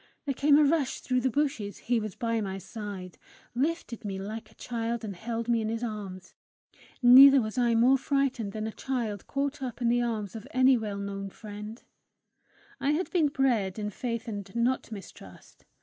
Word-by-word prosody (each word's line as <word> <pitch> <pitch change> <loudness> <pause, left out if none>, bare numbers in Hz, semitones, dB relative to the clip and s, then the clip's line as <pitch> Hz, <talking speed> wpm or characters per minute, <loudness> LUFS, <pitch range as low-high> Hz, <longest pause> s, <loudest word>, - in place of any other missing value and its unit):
There 280 - 0
came 285 +2 +4
a 305 - +6
rush 290 -2 +1
through 255 -1 0
the 260 - +2
bushes; 265 -7 -1
he 240 0 0
was 215 -3 -5
by 230 -2 -1
my 195 -2 -3
side, 195 -3 -8 0.3
lifted 270 -2 -2
me 195 -2 -4
like 215 +3 -6
a 220 - -22
child, 235 -1 -3
and 205 -3 -5
held 230 +4 -4
me 235 -1 +2
in 220 - -2
his 230 +1 -3
arms; 195 -5 -6 0.7
neither 270 +3 +10
was 215 -3 -3
I 240 -2 +2
more 255 +4 +5
frightened 265 -7 0
than 215 +1 -4
a 220 - -3
child 225 -6 -3
caught 280 0 -2
up 250 -3 -5
in 240 -2 +1
the 240 +1 +3
arms 225 -3 -2
of 225 +3 -8
any 260 -2 +5
well 215 -4 -3
known 200 0 -5
friend: 210 +3 -9 1.0
I 285 +2 +1
had 350 +5 -2
been 330 -5 +3
bred 240 -9 +1
in 210 -1 -3
faith 230 +2 -4
and 205 -3 -5
not 240 +1 0
mistrust! 200 -3 -12
230 Hz, 190 wpm, -28 LUFS, 210-260 Hz, 1.0 s, neither